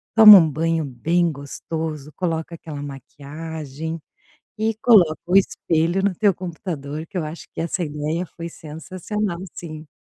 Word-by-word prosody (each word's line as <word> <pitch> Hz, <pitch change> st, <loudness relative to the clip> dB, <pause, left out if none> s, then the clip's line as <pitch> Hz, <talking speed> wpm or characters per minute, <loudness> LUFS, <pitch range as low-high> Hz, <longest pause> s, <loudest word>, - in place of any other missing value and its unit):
Toma 215 Hz, -2 st, +12 dB
um 165 Hz, -, +5 dB
banho 165 Hz, +2 st, 0 dB
bem 165 Hz, +7 st, +1 dB
gostoso, 150 Hz, +1 st, -5 dB
coloca 165 Hz, -2 st, -2 dB
aquela 155 Hz, -3 st, -7 dB
maquiagem, 150 Hz, +3 st, -7 dB, 0.6 s
e 220 Hz, 0 st, +1 dB
coloca 180 Hz, -10 st, +6 dB
o 180 Hz, +2 st, +3 dB
espelho 170 Hz, -1 st, +2 dB
no 200 Hz, -1 st, +2 dB
teu 205 Hz, -2 st, +3 dB
computador 160 Hz, -4 st, -6 dB
que 195 Hz, -, -11 dB
eu 170 Hz, -, 0 dB
acho 155 Hz, +2 st, -8 dB
que -, -, -4 dB
essa 170 Hz, +2 st, -2 dB
ideia 150 Hz, +4 st, -3 dB
foi 170 Hz, 0 st, -8 dB
sensacional 175 Hz, +5 st, -5 dB, 0.2 s
sim. 155 Hz, -2 st, -8 dB
165 Hz, 145 wpm, -22 LUFS, 155-180 Hz, 0.6 s, Toma